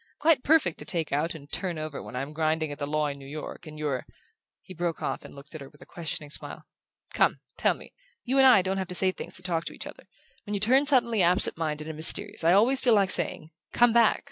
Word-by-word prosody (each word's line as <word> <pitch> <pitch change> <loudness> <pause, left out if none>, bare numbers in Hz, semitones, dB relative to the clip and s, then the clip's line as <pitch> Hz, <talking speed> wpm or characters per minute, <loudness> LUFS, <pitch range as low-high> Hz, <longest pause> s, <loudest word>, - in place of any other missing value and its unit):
Quite 300 -3 +2
perfect 305 - +2
to 150 - -8
take 165 0 -2
out 155 +4 -1
and 145 -2 -12
turn 180 -4 -3
over 155 -2 -6
when - - -10
I'm 135 +4 -5
grinding 155 0 -1
at 145 - -8
the 145 - -3
law 155 +1 0
in 140 -1 -4
New 135 - -12
York, 155 +3 -8
and 155 0 -10
you're 145 -4 -3 0.3
" - - -65
He 185 - -11
broke 170 -1 -3
off - - -3
and - - -13
looked 140 +3 -14
at 155 - -8
her 135 - -10
with 145 - -22
a - - -13
questioning 160 -3 -6
smile. - - -5 0.5
"Come! - - +2 0.2
Tell - - +1
me. - - -15 0.3
You 265 +2 0
and 265 - +7
I 200 -8 +6
don't 190 +1 -2
have 190 - -3
to 180 - -6
say 185 +1 +4
things - - -8
to 185 - -3
talk 170 -3 -2
to - - -6
each - - -7
other. - - -12 0.4
When 210 - -4
you - - -2
turn 260 +7 +3
suddenly 235 -6 +3
absentminded 160 -3 +2
and 160 - -6
mysterious 185 +5 +3
I 170 +2 +4
always 245 +7 +4
feel 240 -3 +4
like 195 -2 +3
saying: 155 -3 -1 0.2
'Come 240 -1 +4
back. 235 -2 +4
170 Hz, 255 wpm, -26 LUFS, 150-210 Hz, 0.5 s, and